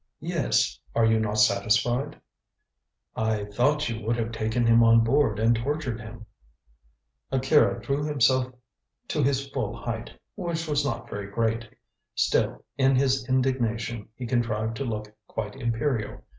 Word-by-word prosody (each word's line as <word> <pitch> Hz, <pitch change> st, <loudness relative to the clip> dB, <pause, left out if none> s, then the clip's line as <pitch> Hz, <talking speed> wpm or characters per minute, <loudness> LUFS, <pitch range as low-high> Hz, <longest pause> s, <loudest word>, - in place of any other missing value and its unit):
"Yes. -, -, 0 dB, 0.2 s
Are 115 Hz, -, +4 dB
you 110 Hz, 0 st, +3 dB
not 105 Hz, -1 st, -1 dB
satisfied?" 110 Hz, +6 st, +2 dB, 1.0 s
"I 110 Hz, -2 st, 0 dB
thought 145 Hz, +9 st, +1 dB
you 115 Hz, -2 st, -4 dB
would 115 Hz, +2 st, 0 dB
have 115 Hz, -1 st, -2 dB
taken 115 Hz, +1 st, -1 dB
him 115 Hz, 0 st, +6 dB
on 115 Hz, 0 st, +6 dB
board 115 Hz, -3 st, +2 dB
and 115 Hz, +2 st, +3 dB
tortured 130 Hz, -1 st, -2 dB
him." 110 Hz, 0 st, -10 dB, 1.1 s
Akira 135 Hz, +3 st, +3 dB
drew 140 Hz, +1 st, -2 dB
himself 130 Hz, -3 st, +2 dB, 0.6 s
to -, -, 0 dB
his 140 Hz, 0 st, +1 dB
full -, -, -2 dB
height, -, -, -5 dB, 0.2 s
which 165 Hz, -1 st, -3 dB
was 150 Hz, -1 st, +1 dB
not 135 Hz, -4 st, -3 dB
very 100 Hz, -1 st, -6 dB
great. 115 Hz, +1 st, -1 dB, 0.5 s
Still -, -, +1 dB
in 135 Hz, 0 st, +4 dB
his 130 Hz, -1 st, +1 dB
indignation 120 Hz, -4 st, 0 dB
he 125 Hz, -, -6 dB
contrived 115 Hz, -2 st, -1 dB
to 135 Hz, -, -3 dB
look 105 Hz, -2 st, -4 dB
quite 105 Hz, +1 st, -5 dB
imperial. 120 Hz, -2 st, -2 dB
115 Hz, 145 wpm, -26 LUFS, 110-135 Hz, 1.1 s, him